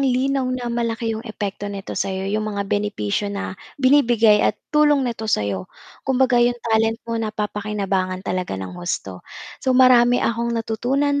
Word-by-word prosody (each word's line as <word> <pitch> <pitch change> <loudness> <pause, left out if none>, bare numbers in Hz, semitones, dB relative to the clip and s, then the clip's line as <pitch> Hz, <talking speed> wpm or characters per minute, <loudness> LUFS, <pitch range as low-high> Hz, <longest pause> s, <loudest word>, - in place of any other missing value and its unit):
linaw 265 0 +1
na 245 -2 -3
malaki 230 -1 -1
'yong 220 - -4
epekto 205 -1 -4
nito 200 -1 -6
sa - - -1
'yo, 190 0 -3
'yong 215 +2 -1
mga 200 -1 -2
benepisyo 205 - -1
na 200 -2 -4 0.2
binibigay 240 -6 +4
at 210 - +1 0.2
tulong 295 -2 +4
nito 225 -3 -4
sa 105 - +2
'yo. 95 -2 -4 0.3
Kumbaga 260 -2 +2
'yong 240 0 +3
talent 225 0 +2
mo 230 -1 -2
napapakinabangan 205 -3 -2
talaga 180 - -2
ng 95 -1 -6
husto. 90 +1 -4 0.4
So 260 -1 +1
marami 245 -1 +5
akong 235 0 -1
natutunan 270 +6 0
225 Hz, 160 wpm, -21 LUFS, 200-245 Hz, 0.4 s, marami